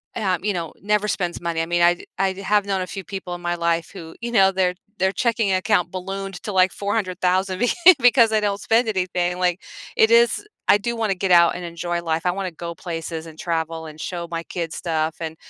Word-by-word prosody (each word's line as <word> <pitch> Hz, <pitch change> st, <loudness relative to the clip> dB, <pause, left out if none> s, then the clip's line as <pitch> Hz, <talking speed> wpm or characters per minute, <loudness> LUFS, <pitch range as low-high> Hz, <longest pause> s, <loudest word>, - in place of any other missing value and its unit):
uh, 190 Hz, -4 st, 0 dB
you 210 Hz, -, 0 dB
know, 170 Hz, -3 st, -4 dB
never 210 Hz, +1 st, 0 dB
spends 175 Hz, -4 st, -2 dB
money, 170 Hz, -1 st, -1 dB
I -, -, -1 dB
mean, 175 Hz, +1 st, 0 dB
I 175 Hz, 0 st, +3 dB, 0.2 s
I 195 Hz, -1 st, +2 dB
have 200 Hz, +1 st, +1 dB
known 190 Hz, -1 st, 0 dB
a 185 Hz, -, -4 dB
few 195 Hz, +3 st, -6 dB
people 190 Hz, 0 st, -6 dB
in 175 Hz, -, -7 dB
my 175 Hz, 0 st, -1 dB
life 170 Hz, -1 st, 0 dB
who, 165 Hz, -4 st, -10 dB
you 235 Hz, 0 st, -4 dB
know, 195 Hz, -4 st, +5 dB
their 185 Hz, -1 st, +1 dB, 0.2 s
their 190 Hz, +1 st, +2 dB
checking 230 Hz, -3 st, 0 dB
account 185 Hz, -1 st, +1 dB
ballooned 195 Hz, +1 st, -5 dB
to, 210 Hz, -, -4 dB
like, 185 Hz, -1 st, +4 dB
$400,000 185 Hz, -2 st, -1 dB
be 245 Hz, +1 st, +2 dB, 0.3 s
because 245 Hz, -2 st, +5 dB
they 220 Hz, -, +2 dB
don't 205 Hz, -1 st, -1 dB
spend 230 Hz, +1 st, +2 dB
anything, 180 Hz, -3 st, -1 dB
like, 180 Hz, 0 st, +1 dB, 0.4 s
it 220 Hz, +1 st, +5 dB
is 235 Hz, -, +4 dB, 0.2 s
I -, -, +6 dB
do 235 Hz, +3 st, -3 dB
wanna 220 Hz, -4 st, 0 dB
get 185 Hz, 0 st, -1 dB
out 170 Hz, -1 st, +6 dB
and 180 Hz, -, -6 dB
enjoy 170 Hz, 0 st, -3 dB
life, 165 Hz, 0 st, -1 dB
I 180 Hz, -, +3 dB
wanna 190 Hz, 0 st, -4 dB
go 170 Hz, +1 st, -7 dB
places 165 Hz, -1 st, -5 dB
and 160 Hz, -1 st, -12 dB
travel 165 Hz, -1 st, -3 dB
and 155 Hz, 0 st, -11 dB
show 170 Hz, 0 st, -5 dB
my 165 Hz, 0 st, -4 dB
kids 170 Hz, -2 st, -5 dB
stuff, 160 Hz, -2 st, -1 dB
and 160 Hz, -1 st, -5 dB
185 Hz, 225 wpm, -22 LUFS, 170-200 Hz, 0.4 s, I